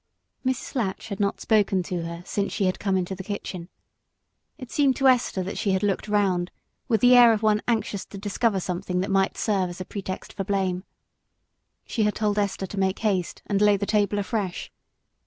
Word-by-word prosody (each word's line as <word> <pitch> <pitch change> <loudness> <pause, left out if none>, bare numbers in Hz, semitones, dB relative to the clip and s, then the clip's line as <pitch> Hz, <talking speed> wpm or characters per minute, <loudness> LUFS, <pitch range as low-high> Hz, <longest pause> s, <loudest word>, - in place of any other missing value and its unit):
For 260 - 0
Mrs. 260 - -3
Latch 225 -3 -2
had 200 - -5
not 200 -1 0
spoken 205 -4 +2
to 175 0 -3
her 170 +1 -6
since 200 0 -2
she 200 - 0
had 185 - 0
come 195 -2 +1
into 185 +1 -2
the 190 0 -7
kitchen, 185 -3 -6 0.9
and 280 - -9
it - - -19
seemed 275 -3 +3
to 270 - +3
Esther 245 -7 +3
that 190 - -5
she 205 -3 +1
had 190 +2 0
looked 205 +1 0
round 190 -4 +1 0.4
with 225 -5 +2
the 250 0 +7
air 240 -1 +8
of 215 0 -2
one 215 -1 +3
anxious 220 -4 0
to 200 - -10
discover 205 +1 0
something 180 0 -2
that 195 +2 -2
might 195 0 +2
serve 195 -4 0
as 175 - -8
a 185 - -5
pretext 190 -1 -6
for 195 - -3
blame. 190 -2 -1 1.0
She 230 - -2
had 210 -1 +2
told 210 -1 0
Esther 200 -1 -1
to 195 +1 -5
make 190 0 +1
haste 195 -5 -1
and 200 -1 0
lay 205 -1 +5
the 200 - -2
table 205 0 +1
afresh. 200 -3 -3
200 Hz, 210 wpm, -25 LUFS, 190-215 Hz, 1.0 s, air